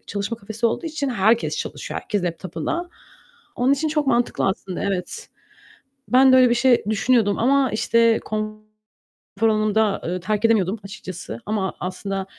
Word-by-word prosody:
çalışma 200 Hz, +3 st, -3 dB
kafesi 220 Hz, +2 st, -2 dB
olduğu 230 Hz, +8 st, -2 dB
için 305 Hz, -3 st, -3 dB
herkes 225 Hz, +1 st, +2 dB
çalışıyor, -, -, -5 dB
herkes 205 Hz, -4 st, -2 dB
laptop'ında. 180 Hz, -, -4 dB, 0.7 s
Onun 255 Hz, +3 st, +3 dB
için 295 Hz, +3 st, 0 dB
çok 300 Hz, -2 st, 0 dB
mantıklı 240 Hz, -5 st, +1 dB
aslında, 190 Hz, 0 st, -3 dB
evet. 200 Hz, -, -4 dB, 0.8 s
Ben 260 Hz, +1 st, +6 dB
de -, -, +8 dB
öyle 255 Hz, -1 st, +6 dB
bir 240 Hz, -, +2 dB
şey 245 Hz, 0 st, +3 dB
düşünüyordum 220 Hz, -1 st, +2 dB
ama, 265 Hz, +2 st, +3 dB
işte, 230 Hz, +1 st, +3 dB
konfor 215 Hz, 0 st, -5 dB, 0.8 s
alanımı 215 Hz, -2 st, +2 dB
da, 215 Hz, -2 st, +2 dB
ııı, 180 Hz, +2 st, -2 dB
terk 210 Hz, +4 st, -1 dB
edemiyordum 215 Hz, -2 st, +2 dB
açıkçası 185 Hz, -, -8 dB
ama 205 Hz, -3 st, -2 dB
aslında 190 Hz, +1 st, -4 dB
215 Hz, 150 wpm, -22 LUFS, 195-245 Hz, 0.8 s, de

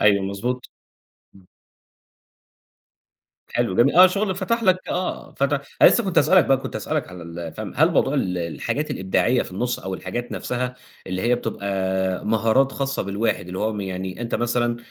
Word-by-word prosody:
أيوه، 100 Hz, -2 st, +4 dB
مضبوط، 120 Hz, +6 st, -3 dB, 0.7 s
إمم. 95 Hz, -1 st, -18 dB, 2.0 s
حلو 95 Hz, -, -1 dB
جميل 135 Hz, +5 st, +4 dB
آه، 185 Hz, +1 st, +9 dB
شغل 195 Hz, +1 st, -1 dB
فتح 230 Hz, +5 st, -1 dB
لَك 185 Hz, -2 st, +2 dB
آه 180 Hz, +1 st, -3 dB
فتح 140 Hz, 0 st, +1 dB, 0.2 s
أنا -, -, +11 dB
لسّه 235 Hz, -, +2 dB
كنت 190 Hz, -, +2 dB
هاسأل 190 Hz, -, +4 dB
لَك 175 Hz, -, +5 dB
بقى 135 Hz, -, +4 dB
كنت 135 Hz, -, -6 dB
هاسأل -, -, -3 dB
لَك -, -, -2 dB
على 90 Hz, -1 st, -9 dB
ال 85 Hz, -1 st, -7 dB
فهم 110 Hz, -1 st, -6 dB
هل 160 Hz, +4 st, +5 dB
موضوع 145 Hz, -4 st, +2 dB
ال 90 Hz, -10 st, 0 dB
الحاجات 85 Hz, -, -3 dB
الإبداعية 95 Hz, +6 st, +1 dB
في -, -, -10 dB
النُص 120 Hz, +6 st, -2 dB
أو 95 Hz, 0 st, -5 dB
الحاجات 120 Hz, +7 st, -5 dB
نفسها 125 Hz, 0 st, -3 dB, 0.3 s
اللي 95 Hz, 0 st, -3 dB
هي 120 Hz, +1 st, +3 dB
بتبقى 95 Hz, -4 st, -2 dB
مهارات 115 Hz, +5 st, +3 dB
خاصّة 135 Hz, 0 st, -2 dB
بالواحد، 100 Hz, -3 st, -1 dB
اللي 90 Hz, +1 st, -6 dB
هو 105 Hz, -1 st, -1 dB
يعني 95 Hz, +1 st, -5 dB
أنت 115 Hz, -, -3 dB
مثلًا 120 Hz, 0 st, 0 dB
115 Hz, 175 wpm, -23 LUFS, 95-135 Hz, 2.0 s, أنا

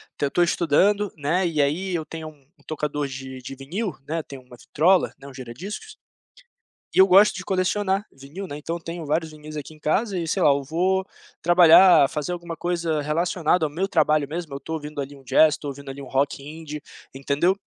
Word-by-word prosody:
até -, -, -1 dB
eu -, -, -7 dB
tô 175 Hz, -, +1 dB
estudando, 185 Hz, +5 st, +2 dB
né, 160 Hz, +6 st, 0 dB
e 155 Hz, -4 st, +1 dB
aí 175 Hz, +7 st, 0 dB
eu 160 Hz, -3 st, -2 dB
tenho 160 Hz, -1 st, -7 dB
um 150 Hz, -2 st, -19 dB, 0.2 s
um -, -, -26 dB
tocador 150 Hz, -2 st, -3 dB
de 130 Hz, -1 st, -8 dB
de 135 Hz, -, -8 dB
vinil, 175 Hz, -, -4 dB
né, 165 Hz, +1 st, -2 dB
tenho 135 Hz, -3 st, -10 dB
uma 125 Hz, -1 st, -15 dB
vitrola, 175 Hz, +9 st, +2 dB
né, 140 Hz, -, -12 dB
um 140 Hz, -, -11 dB
gira-discos, 185 Hz, -, -8 dB, 1.0 s
e -, -, 0 dB
eu 190 Hz, -, +9 dB
gosto 195 Hz, +3 st, +6 dB
de 185 Hz, -, -6 dB
colecionar 195 Hz, +1 st, 0 dB
vinil, 140 Hz, +9 st, -9 dB
né. 145 Hz, -, -7 dB
Então, 165 Hz, +3 st, -4 dB
eu 170 Hz, -, -8 dB
tenho 165 Hz, 0 st, -6 dB
vários 160 Hz, +2 st, -1 dB
vinis 155 Hz, 0 st, -11 dB
aqui 150 Hz, +1 st, -7 dB
em -, -, -18 dB
casa 195 Hz, +6 st, 0 dB
e 170 Hz, -, -3 dB
sei 155 Hz, -, -1 dB
lá, -, -, +6 dB
eu 140 Hz, 0 st, +2 dB
vou 180 Hz, +6 st, 0 dB, 0.4 s
trabalhar, 175 Hz, -2 st, +7 dB
fazer 150 Hz, +1 st, -4 dB
alguma 170 Hz, -1 st, -6 dB
coisa 170 Hz, -4 st, -1 dB
relacionada 165 Hz, +1 st, +1 dB
ao -, -, -6 dB
meu 180 Hz, +6 st, -1 dB
trabalho 155 Hz, -4 st, +2 dB
mesmo, 160 Hz, -2 st, -5 dB
eu 140 Hz, -, -6 dB
tô 160 Hz, -, -7 dB
ouvindo 150 Hz, -1 st, -7 dB
ali 140 Hz, +1 st, -6 dB
um 135 Hz, -, -16 dB
jazz, 155 Hz, +4 st, +4 dB
tô 145 Hz, -, -9 dB
ouvindo 140 Hz, 0 st, -7 dB
ali 135 Hz, +1 st, -8 dB
um 135 Hz, -, -8 dB
rock 135 Hz, +2 st, -1 dB
indie, 150 Hz, 0 st, -8 dB, 0.3 s
entendeu? 140 Hz, +7 st, +1 dB
155 Hz, 215 wpm, -24 LUFS, 145-180 Hz, 1.0 s, eu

